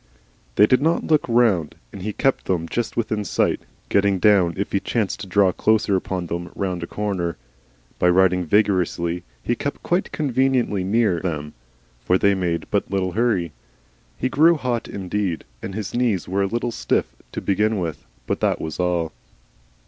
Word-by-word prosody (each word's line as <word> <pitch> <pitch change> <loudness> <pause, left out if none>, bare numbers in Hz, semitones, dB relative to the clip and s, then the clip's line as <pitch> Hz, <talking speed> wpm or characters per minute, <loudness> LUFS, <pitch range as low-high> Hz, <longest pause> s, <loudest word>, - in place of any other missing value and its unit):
They 105 - +7
did 130 +4 +3
not 165 +3 +2
look 155 -2 +3
round, 115 -10 +2 0.2
and 100 - -8
he 105 +3 -2
kept 135 +5 0
them 85 -3 -1
just 120 +6 -3
within 110 -2 -1
sight, - - 0 0.3
getting 100 -1 +2
down 95 -4 +4
if 100 - -2
he 100 - +2
chanced 105 -1 -1
to 100 - -7
draw 95 0 +4
closely 110 0 +2
upon 95 -1 -2
them 85 0 -4
round 90 -3 -2
a 85 - -4
corner. 95 -5 -2 0.6
By 90 - +4
riding 90 0 +4
vigorously 90 -3 +1 0.2
he - - +1
kept 145 +4 -4
quite 175 +2 0
conveniently 130 -8 +1
near 100 -2 +2
them, 75 -4 -4 0.5
for 90 - +3
they 100 +1 +3
made 90 -3 -1
but - - 0
little 95 -1 0
hurry. 95 -5 +1 0.7
He 130 - 0
grew 160 +6 +5
hot 125 -6 -2
indeed, 95 -2 -3 0.2
and 95 - -6
his 105 -3 -4
knees 120 -7 0
were 95 +2 0
a 100 - +2
little 120 +3 -2
stiff - - -1 0.2
to - - -2
begin 105 +2 +1
with, 85 -5 -4 0.2
but - - -2
that - - +1
was 80 +1 -5
all. 90 -2 0
100 Hz, 175 wpm, -22 LUFS, 90-115 Hz, 0.7 s, They